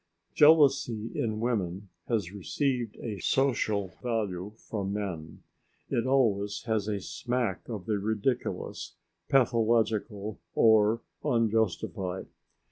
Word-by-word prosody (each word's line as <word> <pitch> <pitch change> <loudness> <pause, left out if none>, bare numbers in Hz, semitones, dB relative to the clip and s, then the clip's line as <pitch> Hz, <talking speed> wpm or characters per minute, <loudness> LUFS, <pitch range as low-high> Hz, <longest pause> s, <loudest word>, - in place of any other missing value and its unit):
Jealousy 140 -7 +4
in 110 -2 -1
women 100 -5 -2 0.2
has 105 -7 -1
received 120 - -2
a 105 -4 -4
social 110 -6 +1
valuation 105 -4 -3
from 100 -3 -4
men; 90 -7 -5 0.5
it 120 +2 +1
always 105 -7 +1
has 110 -3 -1
a 105 -2 -1
smack 120 +5 -3
of 105 -6 -5
the 105 -2 0
ridiculous, 110 +4 -2 0.3
pathological, 115 -4 +1 0.2
or 110 0 +5 0.2
unjustified. 110 - 0
110 Hz, 100 wpm, -29 LUFS, 100-120 Hz, 0.5 s, or